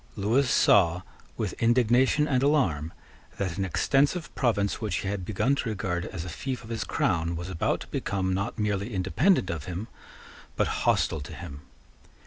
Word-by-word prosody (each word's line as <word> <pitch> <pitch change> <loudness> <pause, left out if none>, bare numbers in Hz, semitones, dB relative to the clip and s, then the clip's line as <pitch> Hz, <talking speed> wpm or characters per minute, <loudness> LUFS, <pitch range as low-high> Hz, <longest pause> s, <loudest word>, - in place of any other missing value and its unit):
Lewis 115 +6 +2
saw, 90 -5 +4 0.3
with - - -2
indignation 125 +5 +3
and 130 -4 +1
alarm, 95 - +1 0.5
that 95 -3 -3
an - - +1
extensive 140 - +1
province 105 -5 0
which 105 -5 -1
he - - -4
had 100 -1 -2
begun 110 +8 +1
to 140 -4 -1
regard 90 -4 -2
as 85 -2 -6
a - - -6
fief 125 - -5
of 110 - -10
his 115 -2 -2
crown 85 0 0
was 90 +3 -5
about 85 - 0
to - - -8
become, 95 -2 -1
not 100 +4 -2
merely 105 0 -1
independent 95 - +2
of 80 -3 -5
him, 90 +5 -5 0.7
but - - +2 0.2
hostile 80 - +1
to 70 - -8
him. 70 +1 -9
100 Hz, 170 wpm, -27 LUFS, 90-125 Hz, 0.7 s, saw